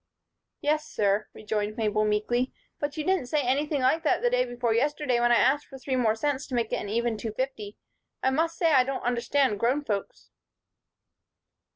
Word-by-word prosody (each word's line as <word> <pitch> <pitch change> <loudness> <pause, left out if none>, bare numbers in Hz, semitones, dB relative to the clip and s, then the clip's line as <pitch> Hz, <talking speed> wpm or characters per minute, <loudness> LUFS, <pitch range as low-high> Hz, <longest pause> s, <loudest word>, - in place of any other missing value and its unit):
"Yes, 305 +1 0
sir," 205 0 +1
rejoined 210 0 -3
Mabel, 215 -1 +1
meekly. 225 +4 0 0.3
"But 290 +1 -3
you 305 - -1
didn't 370 -6 +1
say 295 +2 0
anything 285 +3 0
like 260 +6 +3
that 315 - +1
day 250 0 +2
before 245 -2 -1
yesterday 285 0 +1
when 240 0 +3
I - - +6
asked 270 +5 +3
for 270 - -10
three 260 0 -3
more 225 -4 +2
cents 280 +3 -2
to 260 - -4
make 230 -2 -1
it - - +2
an 205 - -5
even 235 +1 0
two 215 0 -5
fifty. 220 -4 -4 0.5
I 265 - +3
must 325 +4 0
say 330 -2 +3
I 265 -4 +6
don't 265 +1 -4
understand 245 -1 +1
grown 255 +6 +1
folks." 205 -7 -4
250 Hz, 190 wpm, -27 LUFS, 225-285 Hz, 0.5 s, I